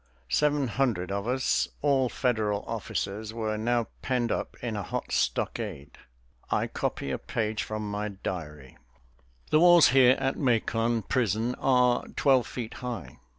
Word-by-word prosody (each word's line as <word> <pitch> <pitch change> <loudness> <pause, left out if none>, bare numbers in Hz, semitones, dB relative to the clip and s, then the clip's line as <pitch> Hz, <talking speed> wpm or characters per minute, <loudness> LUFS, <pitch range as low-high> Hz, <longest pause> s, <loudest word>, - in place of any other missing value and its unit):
Seven 145 - +2
hundred 105 -6 0
of 100 +2 -2
us, 130 +1 +1 0.2
all 135 -3 +3
Federal 110 -6 0
officers, 110 -1 -4
were 110 -2 -2
now 120 +2 0 0.2
penned 125 -3 0
up - - -3
in 115 -3 -2
a 105 - -2
hot - - -4
stockade. 75 - -2 0.5
I - - +1
copy 70 - -3
a - - -2
page 110 -1 -2
from 110 -1 -4
my 105 +1 -2
diary: 75 -8 -7 0.7
"The 155 - +5
walls 175 -2 +7
here 130 -1 +6
at 135 - -1
Macon 115 -3 +1
prison 115 +1 0
are 125 -2 +3
twelve 130 -4 +3
feet 115 -3 -6
high. 125 - -6
115 Hz, 145 wpm, -28 LUFS, 105-125 Hz, 0.7 s, walls